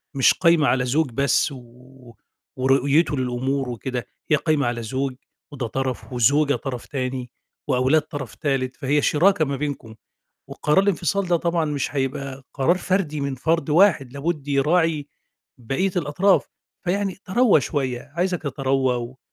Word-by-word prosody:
مش 135 - +5
قايمة 170 -4 +3
على 125 -1 +2
زوج 140 +2 +1
بس، 140 +4 +2
و 125 -1 -14 0.4
ورؤيته 140 +4 +2
للأمور 130 +1 -1
وكده، 125 0 -4 0.3
هي 150 - +7
قايمة 150 -3 +1
على 120 -1 -2
زوج 130 +3 -2 0.4
وده 130 -5 -4
طرف 130 +1 -4
وزوجة 140 +5 +3
طرف 125 -3 -5
تاني 130 -2 -4 0.4
وأولاد 130 +5 +3
طرف 145 -6 -7
تالت، 135 -4 -1
فهي 145 +1 +1
شِراكة 160 +3 +3
ما 140 -1 -2
بينكم، 135 -6 -5 0.5
وقرار 150 +4 +1
الإنفصال 195 0 0
ده 175 - +3
طبعًا، 170 -1 0
مش 145 -1 -3
هيبقى 135 0 -3
قرار 160 +7 +2
فردي 185 -6 -1
من 140 -1 -2
فرد 160 +3 0
واحد، 155 -6 +3
لابد 145 0 -3
يراعي 150 +1 +2 0.5
بقية 135 +11 -1
الأطراف. 180 +5 +2 0.4
فيعني 195 +1 -1
تروّى 210 - +4
شوية، 135 0 -3
عايزك 180 0 0
تتروّى 135 -2 0
و 120 +2 -6
140 Hz, 145 wpm, -23 LUFS, 130-160 Hz, 0.5 s, هي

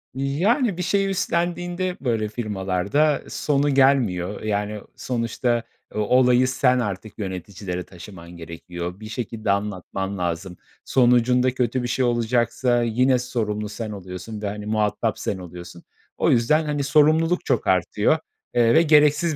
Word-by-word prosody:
Yani, 175 - +1
bir 180 - -2
şey 195 +2 +1
üstlendiğinde 175 0 -1
böyle 115 -5 0
firmalarda 105 +6 0
e, - - -13
sonu 145 0 0
gelmiyor. 115 -9 +2
Eee, 110 - -5
yani, 105 +1 -2
o - - -19
sonuçta 120 -1 -1 0.3
e - - -4
olayı 125 +3 +4
sen 130 -1 +2
artık 105 -1 -5
yöneticilere 95 -1 -5
taşıman 85 -1 -12
gerekiyor, 85 +2 -7
bir 110 0 -9
şekilde 110 -2 -3
anlatman 100 -1 -3
lazım. 90 +1 -3 0.3
Sonucunda 125 0 +3
kötü 125 0 -1
bir - - -2
şey 130 +1 0
olacaksa 120 +1 +1
yine 125 +3 +2
sorumlu 105 -4 -3
sen 110 0 -5
oluyorsun 100 +2 -7
ve, 105 - -2
hani, 105 +1 -5
muhatap 110 +1 0
sen 95 - -2
oluyorsun. 85 -1 -10 0.3
O - - +2
yüzden, 150 +7 +3
hani, 145 -2 -1
sorumluluk 155 +4 +3
çok - - 0
artıyor, 105 - +2 0.4
eee, 115 -1 +4
ve 160 - +6
gereksiz 150 0 +4
115 Hz, 145 wpm, -23 LUFS, 100-135 Hz, 0.4 s, ve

